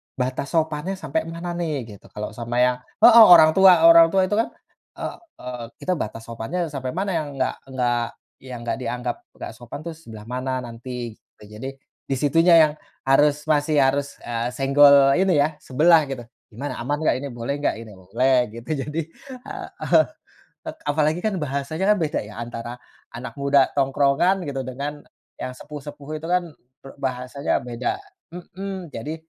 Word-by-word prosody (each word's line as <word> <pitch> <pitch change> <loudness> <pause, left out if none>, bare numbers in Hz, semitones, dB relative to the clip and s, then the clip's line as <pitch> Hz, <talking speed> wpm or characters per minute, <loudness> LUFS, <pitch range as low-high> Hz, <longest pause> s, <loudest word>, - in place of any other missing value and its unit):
batas 130 +2 -2
sopannya 160 +3 0
sampai 160 -4 -2
mana 170 +1 -6
nih 165 -3 -1 0.2
gitu 100 - -13
kalau 105 +1 -4
sama 120 +2 -5
yang, 125 0 +2 0.3
heeh, 230 0 +10
orang 160 -2 +8
tua 185 -2 +6
orang 165 0 +9
tua 190 +3 +2
itu 195 +3 0
kan, 230 - +1 0.5
eee - - -5 0.3
eee, 125 -2 -6 0.2
kita 185 - -1
batas 110 +1 -5
sopannya 115 +8 -6
ya - - -3
sampai 130 -3 -4
mana 195 +2 -1
yang 155 -2 -3
enggak 130 -1 -2
enggak 125 -2 0 0.4
yang 130 -2 -8
nggak 120 - -2
dianggap 120 0 -3 0.2
enggak - - -7
sopan 120 +4 -9
itu 170 - -5
sebelah 115 -10 -11
mana 130 +2 -3
nanti 120 0 -7
gitu - - -23 0.2
jadi 130 - -5 0.4
di - - -2
situnya 165 +4 +4
yang 155 -1 +3 0.4
harus 145 +2 +3
masih 150 0 +2
harus, 140 +1 +2 0.2
eee, 115 0 -2
senggol 140 0 +6
ini 190 -1 +3
ya 145 - +2
sebelah 155 +3 +4
gitu 135 -3 -5 0.3
gimana 135 +7 -5
aman 145 +5 -1
enggak - - +3
ini 140 - -5
boleh 120 +3 -3
enggak 145 - 0
ini 110 -2 -11
boleh 115 +9 0 0.2
gitu 115 +4 -10 0.2
jadi, 150 +2 -3 0.4
heeh, - - 0 0.9
apalagi 155 +3 +1
kan 215 -2 0
bahasanya 145 +4 -3
kan - - -3
beda 155 - -1
ya 105 - -11
antara, 120 0 -6 0.4
anak 125 +2 -7
muda 140 -1 +3
tongkrongan 140 +7 +2
gitu 140 -3 -4
dengan 140 +3 -5 0.4
yang 130 - -5
sepuh-sepuh 145 0 -10
itu 160 - -7
kan, 180 0 +2 0.4
eee, 135 - -11
bahasanya 130 +1 -3
beda, 120 0 -3 0.3
mhm, 185 0 -7
jadi, 130 +8 -5
140 Hz, 170 wpm, -23 LUFS, 125-160 Hz, 0.9 s, heeh